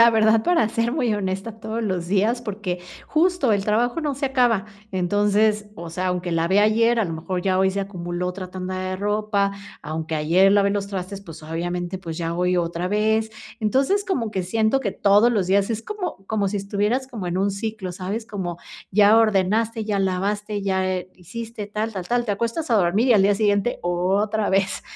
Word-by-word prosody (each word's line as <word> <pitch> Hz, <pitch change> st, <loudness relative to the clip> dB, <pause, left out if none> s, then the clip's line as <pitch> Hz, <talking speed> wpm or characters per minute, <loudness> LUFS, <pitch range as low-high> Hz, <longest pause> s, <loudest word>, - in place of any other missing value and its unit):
la 230 Hz, -, +9 dB
verdad, 220 Hz, 0 st, +4 dB
para 345 Hz, -11 st, +3 dB
ser 230 Hz, +1 st, 0 dB
muy 250 Hz, -7 st, +1 dB
honesta, 205 Hz, +2 st, -3 dB
todos 225 Hz, +1 st, -3 dB
los 185 Hz, -5 st, -2 dB
días, 210 Hz, +6 st, +1 dB
porque 200 Hz, -5 st, -4 dB, 0.3 s
justo 320 Hz, -6 st, +2 dB
el 200 Hz, 0 st, 0 dB
trabajo 240 Hz, +8 st, +1 dB
no 295 Hz, -3 st, -1 dB
se 275 Hz, +1 st, -3 dB
acaba, 245 Hz, -7 st, +2 dB, 0.3 s
entonces, 205 Hz, +3 st, +2 dB
o 170 Hz, -2 st, -8 dB
sea, 185 Hz, +2 st, -2 dB
aunque 180 Hz, -1 st, -1 dB
lavé 170 Hz, +4 st, +2 dB
ayer, 230 Hz, +3 st, +4 dB
a 220 Hz, -, +2 dB
lo 165 Hz, -, -4 dB
mejor 175 Hz, +3 st, -3 dB
ya 190 Hz, -1 st, +1 dB
hoy 190 Hz, 0 st, +3 dB
se 200 Hz, +1 st, -2 dB
acumuló 180 Hz, -2 st, -4 dB
otra 185 Hz, 0 st, -6 dB
tanda 185 Hz, 0 st, -4 dB
de 185 Hz, 0 st, -3 dB
ropa, 205 Hz, 0 st, 0 dB, 0.3 s
aunque 160 Hz, +1 st, -4 dB
ayer 170 Hz, +6 st, +4 dB
lavé 200 Hz, -1 st, +4 dB
los 200 Hz, -1 st, -1 dB
trastes, 195 Hz, 0 st, -5 dB
pues, 165 Hz, -4 st, -11 dB
obviamente, 175 Hz, +3 st, -3 dB
pues 165 Hz, -3 st, -6 dB
ya 165 Hz, -1 st, -2 dB
voy 180 Hz, +1 st, +1 dB
otra 170 Hz, +1 st, -1 dB
vez. 220 Hz, +2 st, +1 dB, 0.3 s
Entonces, 275 Hz, -, +2 dB
como 240 Hz, -, -1 dB
que 190 Hz, -3 st, -2 dB
siento 220 Hz, +7 st, +1 dB
que 205 Hz, -6 st, -1 dB
todos 205 Hz, +5 st, +4 dB
los 200 Hz, -6 st, +1 dB
días 195 Hz, +2 st, +2 dB
es 225 Hz, 0 st, -2 dB
como 410 Hz, -, -4 dB, 0.2 s
como 205 Hz, -2 st, +1 dB
si 205 Hz, -, -2 dB
estuvieras 210 Hz, +6 st, -1 dB
como 215 Hz, -8 st, -6 dB
en 175 Hz, +1 st, -2 dB
un 195 Hz, +1 st, +1 dB
ciclo, 200 Hz, -2 st, -4 dB
¿sabes? 195 Hz, +5 st, -4 dB
Como 185 Hz, -6 st, -4 dB, 0.4 s
ya 210 Hz, +2 st, +6 dB
ordenaste, 220 Hz, +2 st, +2 dB
ya 205 Hz, -2 st, -1 dB
lavaste, 205 Hz, +2 st, -1 dB
ya, 190 Hz, -1 st, 0 dB
eh, 185 Hz, -1 st, -3 dB
hiciste 215 Hz, +4 st, -7 dB
tal, 215 Hz, +2 st, -3 dB
tal, 185 Hz, -3 st, -5 dB
tal, 240 Hz, 0 st, +1 dB
te 215 Hz, -, -2 dB
acuestas 235 Hz, +9 st, -2 dB
a -, -, +4 dB
dormir 200 Hz, +7 st, +2 dB
y -, -, +7 dB
al 200 Hz, -3 st, +5 dB
día 200 Hz, +1 st, +4 dB
siguiente 205 Hz, +2 st, +1 dB
otra 195 Hz, +5 st, 0 dB
vez, 190 Hz, 0 st, +1 dB
200 Hz, 200 wpm, -23 LUFS, 185-220 Hz, 0.4 s, la